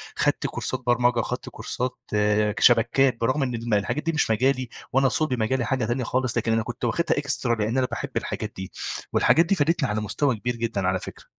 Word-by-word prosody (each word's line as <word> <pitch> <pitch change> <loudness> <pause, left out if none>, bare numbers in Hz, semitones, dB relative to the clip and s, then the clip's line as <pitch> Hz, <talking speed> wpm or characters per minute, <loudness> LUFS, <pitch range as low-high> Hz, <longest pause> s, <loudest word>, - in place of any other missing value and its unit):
خدت - - +1
كورسات 130 - -3
برمجة 120 0 +3
خدت - - -5
كورسات 125 +1 -4 0.2
آآ، 105 0 +2
شبكات. 120 +2 +4
برغم 130 +5 +1
إن 125 -2 -2
الم 115 -1 -3
الحاجات 105 +9 0
دي 165 - 0
مش 155 -7 +1
مجالي 130 +2 +1 0.2
وأنا 135 0 +4
صلب 155 -2 0
مجالي 120 +3 0
حاجة 125 +1 0
تانية 120 +3 -1
خالص، 125 +1 -1
لكن 115 0 0
أنا 115 0 +2
كنت 120 +2 -5
واخدها 170 +8 +1
extra 140 -2 -1
لأن 110 +4 0
أنا 130 - +3
باحب - - -4
الحاجات - - -4
دي. 95 0 -7 0.4
والحاجات 165 - +4
دي 195 - +2
فادتني 150 -3 +1
على 105 +1 -1
مستوى 125 +5 0
كبير 120 +3 -3
جدًا 115 -5 -2
على 95 0 +1
فكرة. - - -10
120 Hz, 205 wpm, -25 LUFS, 110-135 Hz, 0.4 s, شبكات